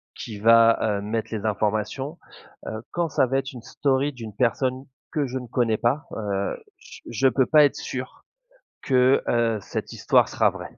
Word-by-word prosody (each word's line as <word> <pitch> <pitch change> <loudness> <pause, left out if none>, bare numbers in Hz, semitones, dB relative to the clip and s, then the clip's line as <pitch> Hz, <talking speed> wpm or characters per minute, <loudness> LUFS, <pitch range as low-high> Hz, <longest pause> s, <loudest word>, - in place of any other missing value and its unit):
qui 105 -3 -7
va, 115 +1 +6 0.2
heu, - - -6
mettre 110 +2 -3
les 110 -1 -4
informations. 110 - -2 0.5
Heu, 110 0 -5
quand 170 -1 -1
ça 140 - +2
va 135 +2 0
être 135 +1 -6
une 125 - -9
story 140 +3 0
d'une 115 -4 -9
personne 130 +3 0 0.3
que 150 -4 -1
je 130 +1 -4
ne 125 - -9
connais 115 -2 +1
pas, 135 +8 0
heu, 100 -2 -2 0.2
j - - -14
je 120 +3 +2
peux 130 +1 +2
pas 150 +3 +6
être 140 - 0
sûr 130 -1 -7 0.6
que, 130 0 +3
heu, 115 -2 +1
cette - - -5
histoire - - +3
sera - - +2
vraie. - - -10
120 Hz, 185 wpm, -24 LUFS, 110-135 Hz, 0.6 s, va